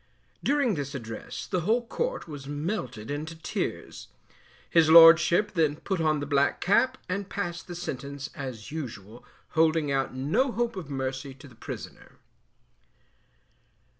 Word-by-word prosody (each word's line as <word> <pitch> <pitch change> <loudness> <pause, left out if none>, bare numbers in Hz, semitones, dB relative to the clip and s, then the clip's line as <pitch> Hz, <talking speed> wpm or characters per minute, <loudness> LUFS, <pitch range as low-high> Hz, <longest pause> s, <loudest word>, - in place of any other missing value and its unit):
During 280 -5 +2
this 140 -3 -4
address 120 0 -6
the 185 - -1
whole 225 +8 +1
court - - -3
was 145 -3 -8
melted 145 - -4
into 155 +3 -4
tears. 160 - -4 0.6
His 165 -2 +4
Lordship 170 +5 +8
then 155 -3 +2
put 185 +2 -3
on 155 -1 +2
the 145 - -3
black 140 0 +2
cap 255 +7 +2
and 200 +2 -3
passed 175 -4 -4
the 175 - -7
sentence 140 -4 -6
as 130 -5 -7
usual, 120 -7 -7 0.3
holding 160 -2 +2
out 135 -1 0
no 190 - +1
hope 235 -1 -1
of 175 -7 -7
mercy 135 0 -4
to 135 +1 -14
the 130 - -16
prisoner. - - -9
155 Hz, 140 wpm, -27 LUFS, 135-180 Hz, 0.6 s, Lordship